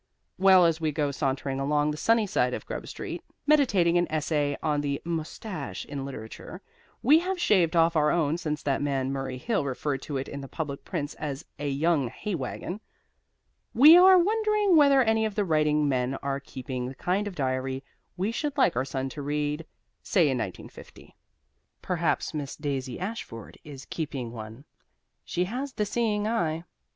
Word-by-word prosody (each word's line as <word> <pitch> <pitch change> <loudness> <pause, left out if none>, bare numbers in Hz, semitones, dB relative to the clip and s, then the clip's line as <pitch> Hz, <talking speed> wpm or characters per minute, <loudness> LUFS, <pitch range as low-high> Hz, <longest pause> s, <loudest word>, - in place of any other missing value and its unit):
Well, 190 -2 +7
as 165 -1 +1
we 155 -1 +1
go 145 -1 0
sauntering 135 -1 -2
along 145 +2 +1
the - - -4
sunny 225 +6 +3
side 200 - +1
of - - -8
Grub - - -6
Street, - - -6 0.2
meditating 200 - +4
an 175 - +1
essay 150 -2 0
on 150 -2 +1
the 140 -1 -2
Mustache 165 0 -5
in 140 -2 -5
Literature 110 -5 -9 0.4
(we 295 +6 +6
have 370 +1 -3
shaved 185 - +3
off 165 0 +4
our 150 -1 +3
own 160 0 +1
since 150 -3 -3
that 140 -1 0
man 135 -2 -1
Murray 135 -1 -4
Hill 205 - -1
referred 135 0 -2
to 145 - -4
it 135 - -4
in 140 - -6
the 135 - -8
public 140 -1 -5
prints 150 -6 -4
as 145 -3 -4
"a 145 0 -2
young 145 0 +1
hay 200 - -5
wagon"), 175 +6 -4 0.9
we 300 +7 +9
are 370 +1 +8
wondering 425 0 +3
whether 280 -3 +6
any 220 -1 +2
of 215 -2 -2
the 205 - +1
writing 150 -2 +2
men 130 -1 0
are 140 0 -1
keeping 130 -2 -5
the 135 - -7
kind 190 +8 -1
of 195 - -6
diary 130 -1 -2 0.3
we 195 +5 0
should 290 +4 -3
like 260 - +3
our 130 +2 0
son 135 0 -3
to 145 - -7
read, 150 +2 -2 0.3
say 185 - +1
in 150 - +3
1950. 95 -5 -9 0.7
Perhaps 170 -3 -1
Miss 145 -3 -4
Daisy 135 -4 -4
Ashford 185 - -6
is 140 -3 -10
keeping 135 -7 -4
one. 110 +3 -9 0.6
She 180 - -1
has 255 +8 -4
the 210 - -1
seeing 210 -1 0
eye. 165 -8 -1
155 Hz, 180 wpm, -27 LUFS, 140-205 Hz, 0.9 s, we